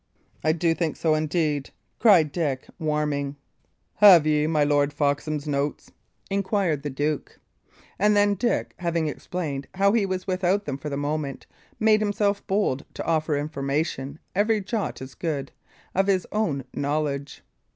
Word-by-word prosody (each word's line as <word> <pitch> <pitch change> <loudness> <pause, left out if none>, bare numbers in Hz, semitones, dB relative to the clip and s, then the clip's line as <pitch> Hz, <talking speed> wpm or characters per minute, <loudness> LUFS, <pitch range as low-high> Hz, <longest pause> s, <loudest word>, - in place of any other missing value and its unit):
"I 155 - +4
do 165 +1 +1
think 165 -2 -1
so, 160 -2 +1
indeed," 155 -2 0 0.3
cried 175 -10 +5
Dick, 145 -6 -2
warming. 150 -3 -1 0.6
"Have 185 -7 +8
ye 150 0 +2
my 155 -2 +2
Lord 145 0 +2
Foxham's 145 +1 -1
notes?" 145 0 -2 0.4
inquired 195 -6 0
the 145 - -3
duke. 145 +2 -2 0.6
And 210 +2 +4
then, 205 0 +4
Dick, 235 +4 -1
having 170 -2 0
explained 150 -2 -4
how 200 +1 +4
he 215 -4 +2
was 185 -1 -3
without 190 +1 +1
them 140 -1 -4
for 150 - -5
the 140 - -3
moment, 145 -1 -3 0.3
made 215 -1 +4
himself 205 -1 +1
bold 190 -9 0
to - - -5
offer 155 -2 +1
information 140 -1 -2 0.2
every 215 +3 +2
jot 205 - -3
as 130 0 -10
good, 145 -4 -3 0.4
of 195 +1 +2
his 190 -3 +2
own 170 -11 0
knowledge. 145 -1 -2
155 Hz, 150 wpm, -25 LUFS, 145-190 Hz, 0.6 s, Have